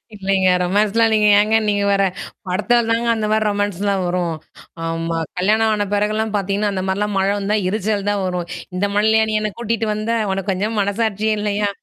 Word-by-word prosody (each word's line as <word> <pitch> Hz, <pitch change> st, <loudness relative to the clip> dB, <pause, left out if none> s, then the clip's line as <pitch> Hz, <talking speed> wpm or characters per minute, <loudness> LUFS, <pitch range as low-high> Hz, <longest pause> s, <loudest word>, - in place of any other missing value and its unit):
இல்லைங்க. 195 Hz, -1 st, +1 dB, 0.2 s
ரொமான்ஸ்லாம் 210 Hz, +4 st, +2 dB
இல்லைங்க, 215 Hz, -1 st, +3 dB
ஏங்க 215 Hz, +1 st, +2 dB
நீங்க 205 Hz, -1 st, +1 dB
வேற, 195 Hz, 0 st, +3 dB, 0.4 s
படத்துல 225 Hz, +6 st, +2 dB
தாங்க 230 Hz, +1 st, 0 dB
அந்த 215 Hz, -, -2 dB
மாரி 215 Hz, 0 st, +2 dB
ரொமான்ஸ்லாம் 205 Hz, -1 st, -1 dB
வரும். 175 Hz, -2 st, -1 dB, 0.5 s
ஆமா. 165 Hz, 0 st, -2 dB, 0.2 s
கல்யாணம் 215 Hz, +4 st, +2 dB
ஆன 205 Hz, -1 st, 0 dB
பெறகுலாம் 215 Hz, +1 st, 0 dB
பாத்தீங்கன்னா, 200 Hz, +1 st, -1 dB
அந்த 185 Hz, -1 st, -2 dB
மாரிலாம் 205 Hz, +2 st, -1 dB
மழ 190 Hz, -, +1 dB
வந்தா 200 Hz, +1 st, 0 dB
எரிச்சல் 205 Hz, 0 st, -1 dB
தான் 205 Hz, -1 st, 0 dB
வரும். 180 Hz, -2 st, -2 dB, 0.3 s
"இந்த 195 Hz, +3 st, 0 dB
மழைலயா 220 Hz, +1 st, +3 dB
நீ 215 Hz, -, -1 dB
என்ன 215 Hz, -1 st, -2 dB
கூட்டிட்டு 230 Hz, -1 st, -1 dB
வந்த, 215 Hz, +2 st, -3 dB, 0.2 s
உனக்கு 195 Hz, +1 st, -2 dB
கொஞ்சம் 210 Hz, +4 st, -2 dB
மனசாட்சியே 215 Hz, +1 st, 0 dB
இல்லையா? 205 Hz, 0 st, 0 dB
205 Hz, 175 wpm, -19 LUFS, 195-215 Hz, 0.5 s, இல்லைங்க